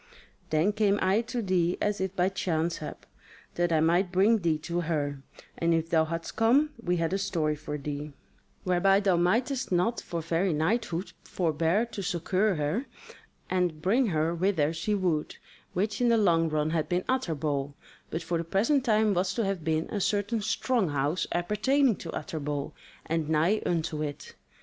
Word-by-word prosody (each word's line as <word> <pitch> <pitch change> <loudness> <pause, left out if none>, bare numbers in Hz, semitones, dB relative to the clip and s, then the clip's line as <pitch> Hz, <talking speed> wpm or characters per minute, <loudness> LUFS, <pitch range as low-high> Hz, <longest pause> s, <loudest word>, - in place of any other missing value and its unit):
Then 160 +7 +2
came 205 -1 +2
I 190 +4 +2
to 240 -3 -2
thee 180 -2 +1
as 210 -2 -1
if 190 0 -2
by 180 0 +2
chance 170 -3 -1
hap, 155 - -8 0.5
that 175 0 0
I 160 -1 +3
might 175 +3 +2
bring 205 +5 +4
thee 165 -4 +1
to 170 +3 -3
her; 145 -4 -2 0.4
and 170 0 +2
if 165 0 -2
thou 160 -1 +4
hadst 165 +1 -5
come, 265 +7 +3
we 180 0 +1
had 165 +1 -1
a 195 - 0
story 165 -6 0
for 150 0 -5
thee, 145 +1 -5 0.5
whereby 190 +2 +3
thou 195 -3 +2
mightest 240 +10 +1
not 185 +7 +1
for 170 - -4
very 165 +3 0
knighthood 180 +3 -1
forbear 170 +5 0
to 230 -4 -7
succour 185 +3 0
her 155 - -1 0.6
and 180 -4 0
bring 235 +7 +3
her 160 -2 0
whither 170 -3 +1
she 170 +6 -1
would, 175 -6 -1 0.4
which 205 +5 -1
in 245 - +4
the 230 - +4
long 165 -6 +3
run 155 0 0
had 160 -2 -1
been 180 +1 0
Utterbol, 150 - -1 0.3
but 165 +1 -4
for 170 -1 -1
the - - -2
present 225 - +1
time 215 -3 +3
was 185 +1 0
to 230 - 0
have 195 -4 -2
been 160 0 0
a 205 - -2
certain 205 +3 0
strong 225 -1 0
house 145 +5 0
appertaining 220 +8 +2
to 165 - -8
Utterbol, 145 -3 -4 0.3
and 160 -1 -1
nigh 165 +7 +2
unto 160 -3 -1
it. 145 -2 -5
175 Hz, 180 wpm, -28 LUFS, 160-205 Hz, 0.6 s, bring